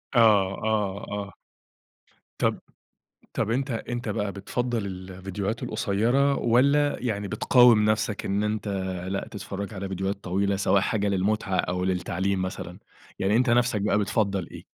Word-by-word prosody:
آه، - - +6
آه، 100 -1 +2
آه. 100 0 -5 1.0
طَب - - +1 0.7
طَب 115 - -1
أنت 135 +2 -1
أنت 120 0 -4
بقى 105 -2 -1
بتفضَّل 115 +2 -2
الفيديوهات 95 +4 -5
القصيرة، 125 +5 +1
والّا 140 +5 +3
يعني 105 -5 -2
بتقاوم 115 0 +5
نفْسَك 110 -1 -1
إن 100 +2 0
أنت 105 0 -2 0.4
لأ 100 - -3
تتفرج 100 0 -6
على 95 0 -5
فيديوهات 95 +1 -3
طويلة، 100 +2 0
سواء 100 0 +2
حاجة 105 -1 0
للمُتعة 100 0 0
أو 90 0 -1
للتعليم 95 +1 -1
مثلًا، 95 - -5 0.4
يعني 100 +3 +2
أنت 125 +1 +3
نفْسَك 120 -3 +2
بقى 105 0 +2
بتفضَّل 100 -3 0
إيه؟ - - -11
105 Hz, 140 wpm, -26 LUFS, 95-115 Hz, 1.0 s, آه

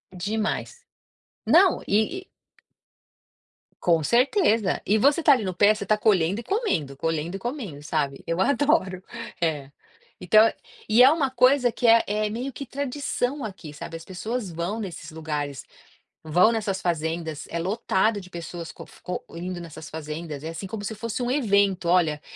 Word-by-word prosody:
Demais. 215 - -3 0.6
Não, 365 +2 +5
e 220 - +1
e - - -20 1.5
Com 165 -3 +3
certeza. 235 - +2
E 210 +2 +3
você 285 +7 +4
está 295 - +5
ali 245 -5 0
no 185 -3 -3
pé, 205 +3 +5
você 210 - -5
está 215 - +2
colhendo 195 -2 +2
e - - -7
comendo, 180 - -1
colhendo 165 +4 -2
e - - -13
comendo, 215 - -5
sabe, 145 -3 -2
eu 165 +1 -1
adoro. 210 - +2 0.4
É. 150 -4 -1 0.5
Então 215 +5 +6
eu - - -3 0.3
e 220 +3 +5
é 260 - +9
uma 285 -4 +1
coisa 255 0 +4
que 235 - 0
é 230 0 +7
é 210 +1 0
meio 250 +5 -4
que 275 - -6
tradição 280 0 -3
aqui, 185 -8 -7
sabe, 165 +2 -7
as 165 - -13
pessoas 210 +2 -4
vão 170 +7 -3
nesses 195 -6 -7
lugares, 150 -3 -4 0.6
vão 175 +7 +4
nessas 210 -4 -1
fazendas, 160 -2 -2
é 170 - -3
lotado 205 +2 0
de 185 - -13
pessoas 170 -1 -7
co - - -11 0.2
co 180 - -4
indo 180 +1 -5
nessas 160 -2 -9
fazendas. 155 -1 -6
É - - -3
assim, 165 +4 -6
como 205 +1 -6
se 220 +2 -4
fosse 230 +3 -4
um 245 - -1
evento, 200 -9 +2
olha: 160 -4 +2
195 Hz, 170 wpm, -25 LUFS, 165-235 Hz, 1.5 s, é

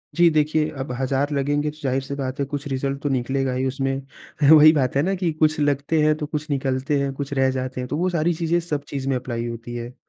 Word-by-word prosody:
जी 170 0 +6
देखिए, 155 0 +1
अब 135 -3 -6
हज़ार 135 +2 0
लगेंगे, 145 +2 0
तो 155 - -18
ज़ाहिर 135 0 0
सी 140 +1 -6
बात 135 -1 -4
है, 140 - +1
कुछ 145 +1 -5
रिज़ल्ट 135 +1 -2
तो 145 - 0
निकलेगा 135 0 0
ही 130 +1 -1
उसमें। 135 +1 -1 0.6
वही 155 0 +9
बात 135 -3 0
है 140 - +3
ना 190 +2 0
कि 175 -3 -1
कुछ 155 0 +1
लगते 145 +2 +1
हैं, 155 0 +4
तो 150 - -3
कुछ 150 +1 -5
निकलते 135 +1 0
हैं, 140 - -1
कुछ 140 +1 -5
रह 135 -1 +2
जाते 130 -1 -4
हैं। 125 - -5
तो 145 - -3
वो 185 +2 +1
सारी 170 0 +1
चीज़ें 170 +1 0
सब 150 -4 -3
चीज़ 135 -1 -3
में 135 - +1
अप्लाई 120 -2 -3
होती 115 +1 -7
है। 120 +1 -6
140 Hz, 250 wpm, -23 LUFS, 130-155 Hz, 0.6 s, वही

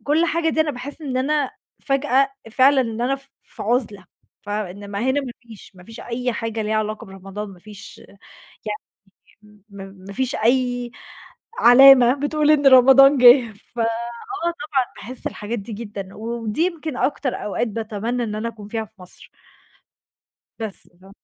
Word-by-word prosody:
وكُل 310 +4 +1
حاجة 330 0 0
دي 315 - +1
أنا 310 -1 +1
باحس 280 +4 -8
إن 265 -4 -3
أنا 280 +1 0 0.3
فجأة 275 0 +1 0.2
فعلًا 265 +4 +4
إن 230 -2 -3
أنا 250 +3 +1
ف 275 0 -18
في - - -10
عُزلة، 215 -4 -1 0.4
ف 205 - -16
إنما 200 0 -5
هنا 260 +4 +1
ما 255 -3 -7
فيش، 225 -5 -14
ما 180 -1 -16
فيش 225 +2 -11
أي 245 +1 -3
حاجة 225 -1 -3
ليها 215 +1 -2
علاقة 215 0 -3
برمضان 195 +2 -8
ما 185 -2 -13
فيش 205 +1 -12 1.2
يعني 210 -1 -24
ما 200 -1 -9
ما 195 +2 -11
فيش 260 +4 -2
أي 245 +1 0 0.7
علامة 250 0 +8
بتقول 295 +2 0
إن 295 -2 +3
رمضان 270 +2 +7
جِه، 245 -2 +7 0.2
فآه 230 -1 0 0.6
طبعًا 305 -6 -1
باحس 250 +3 -10
الحاجات 215 +3 -4
دي 215 +3 -9
جدًا 205 -3 -7
ودي 230 +4 -3
يمكن 320 -6 -2
أكتر 275 -2 -1
أوقات 210 +3 -2
باتمنى 225 +3 -3
إن 210 -1 -4
أنا 220 +2 -3
أكون 210 -3 -11
فيها 225 0 -3
في - - -31
مصر. 180 - -14 1.3
بس 220 -3 -7
ف 195 - -16
240 Hz, 160 wpm, -21 LUFS, 210-270 Hz, 1.3 s, علامة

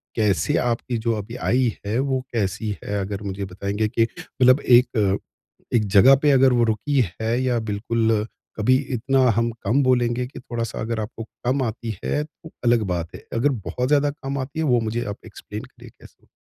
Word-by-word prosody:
कैसे 110 +7 +1
आपकी 120 0 -1
जो 115 +1 0
अभी 105 +3 -6
आय 125 0 0 0.3
है 105 +3 -1
वो 135 -1 0
कैसी 105 -1 -1
है? 105 0 -2
अगर 100 +1 -4
मुझे 100 0 -4
बताएँगे 100 +3 -2
कि 115 +1 +1
मतलब 130 +3 +2
एक 115 -6 +3 0.6
एक 110 -3 +3
जगह 130 +7 +8
पे 150 - +4
अगर 135 -1 +5
वो 120 -1 +3
रुकी 130 +5 +1 0.2
है 115 +2 0
या 125 -2 +1
बिल्कुल 110 0 0 0.3
कभी 110 +4 +3 0.2
इतना 135 +3 +1 0.2
हम 115 +1 +1
कम 120 +8 +2
बोलेंगे 125 -1 +2
कि 130 - -10
थोड़ा-सा 120 -2 -4
अगर 115 0 -2
आपको 110 +1 -5 0.2
कम 130 +3 +1
आती 115 -2 -4
है 150 - 0
तो 160 +1 -14
अलग 120 -2 +4
बात 85 -1 -4
है, - - -12
अगर 120 +5 +2 0.2
बहुत 125 0 -2
ज़्यादा 145 +1 +3
कम 140 -2 -5
आती 135 +4 -5
है 160 - +1
वो 125 -4 +3
मुझे 115 +2 -2
आप 100 -1 -5
एक्सप्लेन - - -8
करिए - - -15
कैसे? - - -19
115 Hz, 190 wpm, -23 LUFS, 105-130 Hz, 0.6 s, जगह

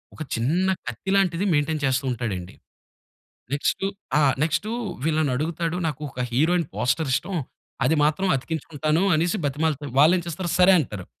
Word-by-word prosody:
ఒక - - -11
చిన్న 160 +12 +1 0.2
కత్తిలాంటిది 190 - 0
మెయి‌న్‌టైన్ 150 +1 0
చేస్తూ 130 0 +1
ఉంటాడండి. 100 -7 -4 1.0
నెక్స్‌టు 145 +6 0 0.3
ఆ! - - +4 0.2
నెక్స్‌టు 160 +8 -1 0.3
వీళ్ళని 155 -3 +1
అడుగుతాడు. 165 +4 -2
నాకు 150 -1 -4
ఒక 125 - -4
హీరోయిన్ 165 +5 +2
పోస్టర్ 135 +3 0
ఇష్టం 190 +6 -1 0.5
అది 160 - +3
మాత్రం 155 +6 +1
అతికించుకుంటాను" 155 +3 -1
అనేసి 170 +6 +1
బతిమాలుతే, 145 0 -1
వాళ్ళేం 170 +3 +5
చేస్తారు. 170 +1 -3
సరే 185 +1 +7
అంటారు. 105 - -4
155 Hz, 135 wpm, -24 LUFS, 140-175 Hz, 1.0 s, సరే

